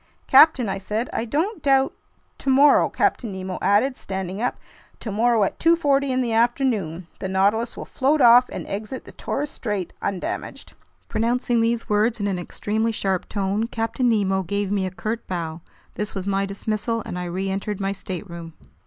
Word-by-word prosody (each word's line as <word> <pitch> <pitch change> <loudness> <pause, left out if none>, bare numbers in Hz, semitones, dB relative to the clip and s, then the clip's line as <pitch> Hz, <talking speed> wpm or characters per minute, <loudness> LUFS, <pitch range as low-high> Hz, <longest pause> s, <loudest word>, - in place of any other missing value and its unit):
"Captain," 270 -3 +6
I 195 0 -2
said, 215 +5 -3
"I 225 - -1
don't 320 - -1
doubt—" 270 -1 +3 0.5
"Tomorrow," 275 +2 +5
Captain 230 -5 0
Nemo 190 -1 -5
added, 210 +8 +3
standing 190 -1 -5
up, 245 - -1 0.4
"tomorrow 225 +1 +2
at 195 - -2
2:40 285 -5 +3
in 255 0 +1
the 235 -2 -1
afternoon, 225 - +1
the 190 - -4
Nautilus 200 +5 +1
will - - -6
float 285 +4 +1
off 245 0 +7
and - - -6
exit 215 +6 -5
the - - -11
Torres 290 +1 -3
Strait 205 -6 -4
undamaged." 190 -3 -4 0.3
Pronouncing 235 +1 +1
these 230 0 0
words 215 +2 +1
in 205 - -1
an 195 -3 -1
extremely 220 +5 -2
sharp 190 -4 -2
tone, 200 +2 -1
Captain 230 +2 -1
Nemo 195 -4 +2
gave 200 +2 -2
me 195 -2 0
a - - -2
curt 215 +5 -4
bow. 165 -2 -4 0.3
This 210 0 -4
was 190 -1 -3
my 195 0 0
dismissal, 215 +3 -2
and 180 - -5
I 180 - -3
reentered 195 +3 -3
my 195 0 -1
stateroom. 170 -4 -7
215 Hz, 170 wpm, -23 LUFS, 195-245 Hz, 0.5 s, off